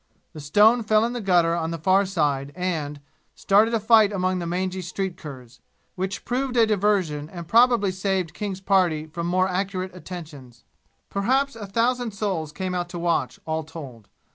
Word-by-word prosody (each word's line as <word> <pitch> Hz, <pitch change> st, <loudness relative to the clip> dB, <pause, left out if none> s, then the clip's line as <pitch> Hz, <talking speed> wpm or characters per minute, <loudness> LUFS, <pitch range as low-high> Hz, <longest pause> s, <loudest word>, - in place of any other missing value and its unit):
The 155 Hz, -, -9 dB
stone 210 Hz, +11 st, +4 dB
fell 215 Hz, 0 st, +3 dB
in 240 Hz, -, -3 dB
the 245 Hz, -, -4 dB
gutter 175 Hz, -4 st, +3 dB
on 165 Hz, -1 st, -1 dB
the 165 Hz, -, -3 dB
far 190 Hz, +4 st, +3 dB
side 145 Hz, -6 st, -1 dB
and, 155 Hz, -6 st, -3 dB, 0.3 s
started 210 Hz, +3 st, +3 dB
a -, -, +1 dB
fight 220 Hz, -1 st, +5 dB
among 185 Hz, -2 st, 0 dB
the 170 Hz, -, -4 dB
mangy 185 Hz, +2 st, -2 dB
street 185 Hz, +1 st, -4 dB
curs, 130 Hz, -5 st, -11 dB, 0.3 s
which 190 Hz, +2 st, -4 dB
proved 250 Hz, 0 st, -1 dB
a 230 Hz, -, +6 dB
diversion 190 Hz, -8 st, 0 dB
and 170 Hz, -2 st, -8 dB
probably 230 Hz, -1 st, +4 dB
saved 185 Hz, -2 st, -2 dB
King's 200 Hz, -3 st, -5 dB
party 180 Hz, -6 st, +2 dB
from 170 Hz, +2 st, -5 dB
more 185 Hz, +1 st, +2 dB
accurate 185 Hz, 0 st, -3 dB
attentions. 150 Hz, -9 st, -10 dB, 0.5 s
Perhaps 260 Hz, +7 st, +1 dB
a 210 Hz, -3 st, -7 dB
thousand 235 Hz, +1 st, 0 dB
souls 185 Hz, -7 st, -2 dB
came 185 Hz, +4 st, -4 dB
out 175 Hz, -1 st, -2 dB
to 175 Hz, -, -6 dB
watch, 170 Hz, -1 st, -1 dB
all 160 Hz, 0 st, -2 dB
told. 140 Hz, -9 st, -10 dB
185 Hz, 175 wpm, -24 LUFS, 165-205 Hz, 0.5 s, a